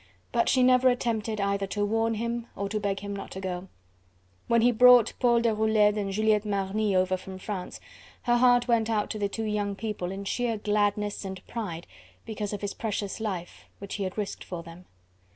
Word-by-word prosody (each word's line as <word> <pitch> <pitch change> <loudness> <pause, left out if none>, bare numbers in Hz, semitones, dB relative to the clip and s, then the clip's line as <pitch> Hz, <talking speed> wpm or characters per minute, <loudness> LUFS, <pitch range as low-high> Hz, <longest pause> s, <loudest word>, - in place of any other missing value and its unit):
But 235 - +2
she 255 -1 +4
never 255 0 +5
attempted 225 -3 -1
either 200 0 0
to 205 +1 -1
warn 225 +2 +1
him 235 +1 -3
or 200 - -3
to 215 - -1
beg 200 -1 -2
him 200 0 -5
not 195 - -7
to 190 - -6
go. 185 -1 -4 0.8
When 235 -1 +3
he 245 - +5
brought 245 0 +7
Paul 235 -1 +4
Deroulede 220 -2 +3
and 200 -2 -2
Juliette 215 +1 +2
Marny 200 0 0
over 185 0 +2
from 185 +1 -8
France, 185 -1 -6 0.4
her 240 -1 +3
heart 245 0 +4
went 230 -2 +2
out 215 -2 0
to 215 - -4
the 200 -1 0
two 225 +3 -4
young 205 -1 -1
people 210 -4 -4
in 195 +1 -5
sheer 235 +2 -1
gladness 205 0 0
and 190 -1 -7
pride 175 -8 -5 0.4
because 210 -2 -4
of 205 - -5
his 205 -1 -3
precious 205 -2 -3
life, 190 -6 -5
which 200 0 -8
he 200 - -2
had 185 +1 -4
risked 210 -2 -4
for 175 -2 -6
them. 170 +2 -12
210 Hz, 200 wpm, -27 LUFS, 195-225 Hz, 0.8 s, brought